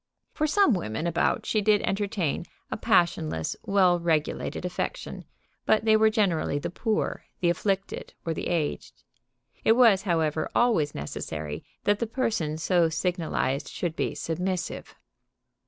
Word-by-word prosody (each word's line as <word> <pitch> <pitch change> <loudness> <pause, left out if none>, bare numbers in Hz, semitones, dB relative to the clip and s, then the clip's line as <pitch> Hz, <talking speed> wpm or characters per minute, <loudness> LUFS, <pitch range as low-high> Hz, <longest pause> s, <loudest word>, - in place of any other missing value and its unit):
For 305 - 0
some 395 - +4
women 155 - -2
about 170 0 +1
she 215 - +1
did 210 0 +3
entertain 195 -6 -1 0.3
a - - -1
passionless, 80 - +1
well 185 -3 +4
regulated 165 +1 -1
affection, 180 - -4 0.4
but 220 0 +3
they 220 -1 +5
were 220 0 +5
generally 195 -10 +1
the 145 - -4
poor, 220 +3 -1
the 175 -2 +3
afflicted, 195 +2 -2
or 165 - 0
the - - -4
aged. 165 -4 -2 0.6
It 225 - +6
was, 225 -5 +5
however, 160 -5 0
always 215 -12 +2
necessary 75 +1 -5 0.2
that 205 0 +2
the 235 - -1
person 215 - -1
so 170 0 +2
signalized 160 -5 -1
should 170 -3 -3
be - - -2
submissive. 180 +2 -3
180 Hz, 140 wpm, -27 LUFS, 160-215 Hz, 0.6 s, It